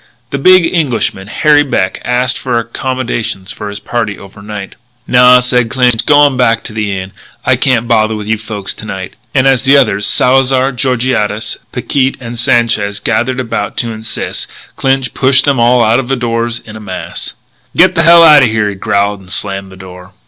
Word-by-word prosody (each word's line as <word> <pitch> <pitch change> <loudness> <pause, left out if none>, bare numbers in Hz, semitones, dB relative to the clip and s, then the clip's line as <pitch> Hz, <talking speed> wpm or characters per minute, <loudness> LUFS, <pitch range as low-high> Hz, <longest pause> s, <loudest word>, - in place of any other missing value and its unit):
The 140 - -3
big 185 +3 +5
Englishman, 125 - -1
Harry 150 +6 +3
Beck, 95 -10 -2
asked 125 +1 0
for 125 -2 -2
accommodations 115 -4 -3
for 105 - -7
his 100 +1 -6
party 110 -4 -3
over 100 +1 -14
night. 105 -2 -8 0.3
"Naw," 125 0 +5
said 125 -2 0
Clinch, 125 -3 +1
"g'wan 145 -2 +4
back 115 -3 +1
to - - -8
the 105 -2 -2
Inn. 95 +1 -7 0.3
I - - +3
can't 120 -3 0
bother 110 -2 +1
with 105 -1 -6
you 110 0 -1
folks 105 -3 -5
to - - -11
night." 95 -3 -7 0.2
And 130 -1 +3
as 135 -2 +3
the 135 +2 +4
others, 105 -6 +2
Salzar, 130 +1 +3
Georgiades, 120 -4 -1
Picquet 135 -2 -1
and 120 -1 -7
Sanchez 115 -4 +1
gathered 120 +3 -1
about 115 -4 -4
to 115 - -2
insist, 110 0 -5 0.3
Clinch 135 -1 -1
pushed 130 +1 +3
them 140 -3 +1
all 120 +1 +3
out 115 +3 +2
of 130 - -4
doors 115 0 -2
in 110 - -11
a - - -8
mass. 95 -3 -7 0.4
"Get - - +5
the 165 - +1
hell 170 0 +7
out 150 -3 +7
o' 130 - +4
here!" 110 -2 0
he - - -5
growled; 100 0 -1
and 90 -1 -14
slammed 95 -1 -2
the 95 - -13
door. 90 0 -13
115 Hz, 190 wpm, -12 LUFS, 105-130 Hz, 0.4 s, hell